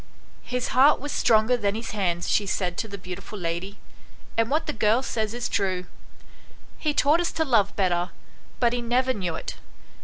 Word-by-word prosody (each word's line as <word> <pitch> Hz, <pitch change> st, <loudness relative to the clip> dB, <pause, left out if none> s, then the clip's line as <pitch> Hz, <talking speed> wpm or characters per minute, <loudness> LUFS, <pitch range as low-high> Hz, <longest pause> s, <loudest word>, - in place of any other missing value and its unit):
"His 250 Hz, 0 st, -3 dB
heart 275 Hz, +4 st, +5 dB
was 290 Hz, +2 st, -5 dB
stronger 220 Hz, +2 st, +3 dB
than 205 Hz, -4 st, 0 dB
his 225 Hz, +1 st, -4 dB
hands," 175 Hz, -5 st, -1 dB
she 205 Hz, -, +2 dB
said 180 Hz, -2 st, -1 dB
to 225 Hz, -, -2 dB
the 200 Hz, -1 st, -7 dB
beautiful 185 Hz, +3 st, -8 dB
lady, 175 Hz, +2 st, -3 dB, 0.3 s
" -, -, -25 dB
and 230 Hz, 0 st, +2 dB
what 305 Hz, +3 st, +1 dB
the -, -, -2 dB
girl 220 Hz, +3 st, +2 dB
says 220 Hz, -4 st, -1 dB
is 240 Hz, 0 st, -2 dB
true; 185 Hz, -2 st, -1 dB, 0.9 s
he 305 Hz, -, +1 dB
taught 295 Hz, +2 st, +3 dB
us 345 Hz, -, -1 dB
to 320 Hz, -, 0 dB
love 215 Hz, -7 st, +2 dB
better, 180 Hz, -2 st, +1 dB, 0.5 s
but 240 Hz, -1 st, +3 dB
he 245 Hz, -, -1 dB
never 250 Hz, +2 st, +1 dB
knew 180 Hz, -6 st, -3 dB
it. -, -, -6 dB
215 Hz, 190 wpm, -25 LUFS, 190-250 Hz, 0.9 s, heart